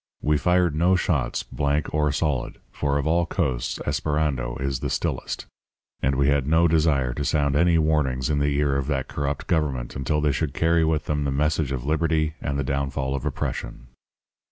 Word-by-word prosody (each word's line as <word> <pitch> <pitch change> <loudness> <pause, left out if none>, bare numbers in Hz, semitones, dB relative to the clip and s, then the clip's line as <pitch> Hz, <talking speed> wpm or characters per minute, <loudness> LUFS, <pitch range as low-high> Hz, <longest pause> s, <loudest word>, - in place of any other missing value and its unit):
We 75 0 +2
fired 90 -1 +2
no 85 +5 +3
shots, 90 - 0
blank 70 0 -1
or 75 -1 +2
solid, 70 -3 -1
for 70 -1 -1
of 70 - -1
all 85 +2 +2
coasts 60 -6 -1
Esperando 75 -6 -1
is 65 -1 -2
the - - -3
stillest; - - -3 0.6
and 65 +1 +1
we 70 +1 +2
had 70 -2 +2
no 80 +2 +4
desire 75 -6 +2
to 70 - -3
sound 70 -1 +1
any 85 +2 +4
warnings 75 -5 +1
in 75 -1 +1
the 70 0 +1
ear 70 -2 +2
of 70 -1 -2
that 70 -3 -1
corrupt 70 -1 -3
government 70 -7 -1
until 70 +3 0
they 75 -1 +2
should 70 +1 -2
carry 80 0 +3
with 80 -2 0
them 75 -1 -1
the 70 - -1
message 75 0 0
of 65 -2 -3
Liberty 80 0 +1
and 70 -2 -2
the 70 - 0
downfall 70 0 -2
of 70 +1 -3
Oppression. 60 -3 -4
75 Hz, 190 wpm, -24 LUFS, 70-80 Hz, 0.6 s, no